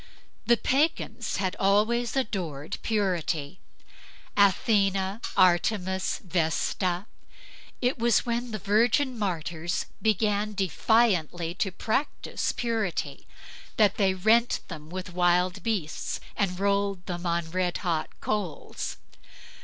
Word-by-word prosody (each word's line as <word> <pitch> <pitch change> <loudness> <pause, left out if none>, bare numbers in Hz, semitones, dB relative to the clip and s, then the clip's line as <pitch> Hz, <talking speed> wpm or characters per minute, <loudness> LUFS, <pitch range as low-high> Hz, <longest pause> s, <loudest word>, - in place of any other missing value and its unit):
The 235 0 +5
pagans 295 +8 0
had 185 0 -1
always 220 +5 +2
adored 175 - -3
purity: 180 -6 -1 0.8
Athena, 195 0 +2 0.2
Artemis, 185 +1 +2
Vesta. 175 +2 0 0.8
It 250 0 +1
was 235 0 +3
when 240 +1 -1
the 215 - -3
virgin 230 +7 +2
martyrs 170 -3 -2 0.2
began 210 -1 +1
defiantly 185 -4 +1
to 190 +2 -1
practice 225 +10 -2
purity 225 -6 -2 0.5
that 210 -3 +4
they 190 -2 +2
rent 225 +5 +3
them 155 -3 -8
with 185 0 -6
wild 180 +1 +2
beasts, 190 -7 -2 0.2
and 185 -3 -1
rolled 200 -2 0
them 175 0 -4
on 170 -1 -1
red 180 0 0
hot 165 -3 0
coals. 200 -8 -3
195 Hz, 105 wpm, -27 LUFS, 175-220 Hz, 0.8 s, The